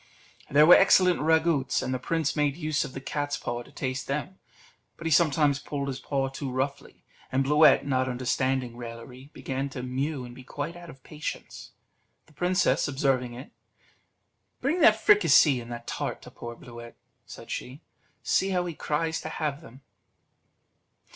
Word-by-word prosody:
There 150 +2 +6
were 175 - +9
excellent 185 -2 +5
ragouts, 160 -2 +2
and 130 - -2
the 130 - -2
prince 160 +2 -1
made 145 -2 +1
use 155 -4 -1
of 130 - -8
the - - -5
cat's 145 +1 -3
paw 120 0 -4
to - - -15
taste 130 0 -4
them; 150 +7 -4 0.6
but 165 - -10
he 165 - 0
sometimes 150 -2 +3
pulled 140 -2 -4
his 130 - -4
paw 135 -2 -1
too 135 +1 -5
roughly, 135 +2 -4 0.3
and 130 +1 +2
Bluet, 150 +1 +5
not 130 -2 0
understanding 130 0 -1
raillery, 120 +3 -10
began 135 +1 -4
to 135 -2 -7
mew 130 +2 -3
and 120 - -10
be 130 - -12
quite 145 +5 -5
out 175 -1 -11
of 135 -4 -14
patience. 150 0 -7 0.5
The - - -23
princess 180 +3 +1
observing 135 -3 0
it, 130 +4 -10 1.1
"Bring 310 +7 0
that - - +6
fricassee 160 - +5
and 120 0 -10
that 120 0 -7
tart - - -4
to - - -12
poor 120 0 -8
Bluet," 120 0 -12 0.3
said - - -10
she; 130 +5 -6 0.4
"see 190 - +1
how 180 -2 0
he 175 - -4
cries 160 +2 -2
to 155 - -6
have 150 -2 -3
them." 135 -1 -15
140 Hz, 170 wpm, -27 LUFS, 130-155 Hz, 1.1 s, were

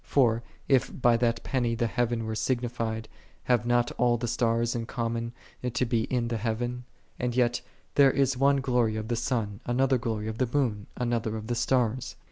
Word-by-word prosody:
For, 115 -5 +3 0.3
if 135 0 +2
by 120 -1 +5
that 115 -1 0
penny 120 -3 0
the 120 0 0
heaven 115 0 0
were 110 - -3
signified, 115 -2 -2 0.4
have 120 -2 +2
not 120 0 +2
all 120 -1 +4
the 120 +1 -3
stars 115 0 +1
in 115 -1 -3
common 115 -1 -2 0.4
to 125 0 +1
be 115 -2 +1
in 120 -2 -1
the 115 - -1
heaven? 120 +3 -2 0.3
And 120 -1 -1
yet, 120 -1 +2 0.2
" - - -36
There 140 -1 +6
is 135 0 +2
one 140 +1 +3
glory 125 -4 +1
of 110 +1 -4
the 120 - +1
sun, 115 -4 -1
another 130 +1 +2
glory 110 -2 -2
of 110 0 -5
the 130 -2 +1
moon, 115 -8 0
another 115 -3 -1
of 110 - -6
the 120 - -2
stars." 125 0 0
120 Hz, 195 wpm, -28 LUFS, 115-125 Hz, 0.4 s, There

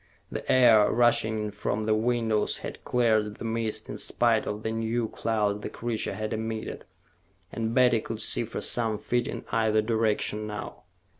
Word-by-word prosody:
The - - -3
air, 115 -5 +6
rushing 110 -2 +2
in 105 - -4
from 105 +1 -2
the 110 0 +2
windows, 110 -1 +1
had - - -7
cleared 110 -4 +1
the - - -8
mist, 115 -1 -2
in - - -6
spite 115 -2 +1
of 105 +1 -4
the 110 - -1
new 115 +1 -1
clouds 105 -2 -1
the - - -5
creature 120 -2 -3
had 110 0 -3
emitted, 110 0 -4 0.7
and 115 0 -2
Betty 125 -3 +4
could 110 0 -6
see 115 - +2
for 115 - -5
some 115 -3 0
feet 120 +3 -1
in - - -6
either 110 -1 +2
direction 110 -1 0
now. 105 -1 -7
110 Hz, 170 wpm, -27 LUFS, 110-115 Hz, 0.7 s, air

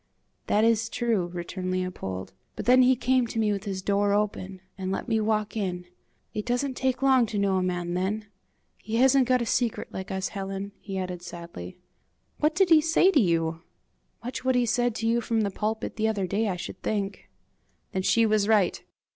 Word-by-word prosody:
"That 210 - +3
is 225 0 +2
true," 225 -8 0
returned 180 +1 -5
Leopold; 180 - -4 0.2
"but - - -5
then 255 +1 +6
he 255 +1 +5
came 255 0 +2
to 225 - -6
me 215 -2 +2
with 200 +1 -3
his 190 -2 -4
door 200 0 +2
open, 195 -2 -1 0.2
and 190 -1 -4
let 195 - -3
me 220 -2 +1
walk 215 0 0
in. 180 -4 -2 0.5
It 210 - -3
doesn't 250 +4 -1
take 260 0 -1
long 260 -3 +5
to 210 - -4
know 200 -1 +2
a - - +1
man 175 -1 -2
then. 195 +4 -1 0.5
He 220 +2 -5
hasn't 260 +1 +4
got 255 -1 +3
a - - -3
secret 235 0 -1
like 190 - -5
us, 190 0 -2
Helen," 195 0 -5
he 195 -1 -6
added, 180 -1 -4
sadly. 170 - -9 0.6
"What 300 +1 +2
did 370 -2 +3
he 315 -1 +8
say 330 +4 +4
to 295 - +4
you?" 165 -3 0 0.6
"Much 245 +2 -5
what 260 0 +2
he 245 -1 +3
said 240 0 +1
to 225 - -2
you 235 +1 +2
from 225 -1 0
the 200 -2 0
pulpit 220 +4 -3
the 220 0 +1
other 205 -3 0
day, 205 +5 0
I 185 - -1
should 180 - -7
think." 200 -2 -3 0.6
Then 190 - -1
she 230 +4 +3
was 215 -2 +2
right! 215 -4 +3
210 Hz, 205 wpm, -27 LUFS, 190-240 Hz, 0.6 s, he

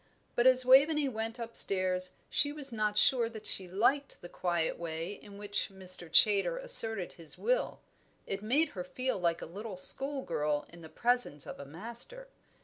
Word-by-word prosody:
But 240 +1 +3
as 255 0 +6
Waveney 280 +3 +4
went 225 0 -5
upstairs 185 -5 +2
she 290 - +1
was 285 -4 -1
not 210 -1 -2
sure 235 0 +3
that 220 -2 -11
she 190 - +1
liked 245 +10 -1
the 175 - -10
quiet 175 -3 -2
way 165 +2 -5
in 205 -1 -14
which 205 0 -4
Mr. 185 -3 -2
Chaytor 210 - +4
asserted 225 - +4
his 165 -3 -11
will; - - -2 0.4
it 195 0 -5
made 270 +10 +1
her 180 - -7
feel 255 +6 -4
like 170 -2 -1
a - - -5
little 200 +3 -8
school 270 +8 +1
girl 150 0 -2
in 170 0 -14
the 160 - -12
presence 240 - 0
of - - -9
a 140 - -8
master. 235 - -5
210 Hz, 175 wpm, -30 LUFS, 180-255 Hz, 0.4 s, as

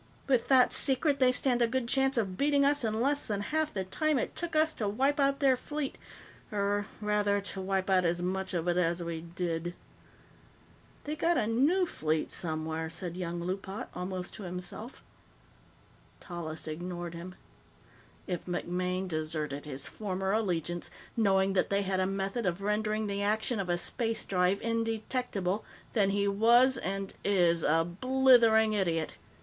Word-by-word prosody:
With 255 -4 +2
that 260 -2 +5
secret, 280 +1 +1
they 255 -1 +5
stand 250 -1 +1
a 235 - +5
good 245 0 -1
chance 270 +1 +2
of 195 -5 0
beating 280 +3 +3
us 285 -1 +2
in 220 -1 0
less 285 +4 0
than 205 -2 -1
half 310 +7 -1
the 190 - -2
time 305 +10 0
it - - -2
took 335 -1 -3
us 310 0 +3
to 210 - -2
wipe 270 +8 +1
out 275 0 +2
their 270 -2 +5
fleet 290 +2 -4 0.6
or, 205 0 0
rather, 210 -1 +1
to 200 -1 -6
wipe 190 0 -1
out 190 -2 +4
as 175 0 +1
much 190 +1 -2
of 170 0 -1
it 175 0 +2
as 170 0 +1
we 165 -1 -4
did." 170 0 -3 1.3
"They 300 +1 -3
got 335 +3 +2
a - - +2
new 285 - +3
fleet 155 - -1
somewhere," 160 -1 -3
said 170 +1 -5
young 175 -1 -3
Loopat, 190 +3 -4
almost 180 0 -5
to - - -9
himself. 180 +6 -7 1.2
Tallis 165 -3 -6
ignored 175 +2 -5
him. 175 +2 -8 0.9
"If 180 -1 -4
MacMaine 180 +1 -2
deserted 155 -3 -3
his 140 0 -1
former 190 +2 -3
allegiance, 175 -5 -1 0.3
knowing 195 -4 +3
that 190 - +1
they 200 0 +1
had 190 -1 0
a 185 - +2
method 195 +3 -2
of 180 +2 -2
rendering 215 +1 0
the 200 -1 -2
action 215 +2 0
of 190 -2 -3
a 175 - +2
space 225 +5 -2
drive 185 +1 +2
indetectable, 225 -3 -1 0.3
then 200 -4 +3
he 200 0 +1
was 235 +6 +5
and 195 +1 -3
is 175 -4 +3
a 165 +2 +3
blithering 230 +2 +4
idiot. 170 -6 0
200 Hz, 165 wpm, -30 LUFS, 175-235 Hz, 1.3 s, that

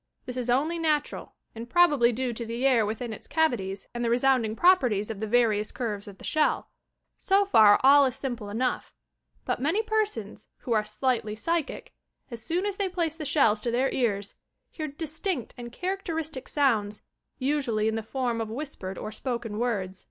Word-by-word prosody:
This 250 - -6
is 250 -1 -3
only 305 +7 +1
natural 305 -3 -1 0.2
and 230 +1 -8
prob 350 0 +5
ably 240 -4 +4
due 245 +1 -2
to 235 - -5
the 235 +3 -3
air 240 -6 +4
within 225 +2 -4
its - - -10
cavities 205 -12 0
and 240 0 -3
the 235 - +1
resound 255 +1 +3
ing 215 0 -3
properties 245 - +3
of 210 - -7
the 220 - -3
various 215 -2 +2
curves 210 -5 -4
of 200 -1 -10
the - - -15
shell. 310 -1 +1 0.5
So 395 +1 +3
far 215 - +6
all 280 +1 +7
is 255 - -3
simple 240 -6 -5
enough, 245 +4 -2 0.5
but - - -2
many 335 +11 +1
persons, 425 - -2
who 245 - -7
are 215 -1 +2
slightly 215 0 -1
psychic, 330 +7 -3 0.4
as 235 -1 -7
soon 345 - -1
as 405 -2 -2
they 395 -2 0
place 340 -4 -1
the 320 -2 -7
shells 230 -8 +3
to 235 - -1
their 250 +3 +1
ears, 205 -5 -1 0.4
bear 310 -2 -3
distinct 315 - -3
and 240 -1 -8
characteristic 325 -4 -4
sounds, 215 -8 +1 0.3
usually 260 -6 0
in 220 - +1
the 225 - -2
form 235 0 -2
of 220 - -4
whispered 225 -7 -6
or 215 - -5
spoken 235 -2 -4
words. 195 -6 -2
245 Hz, 190 wpm, -27 LUFS, 220-300 Hz, 0.5 s, all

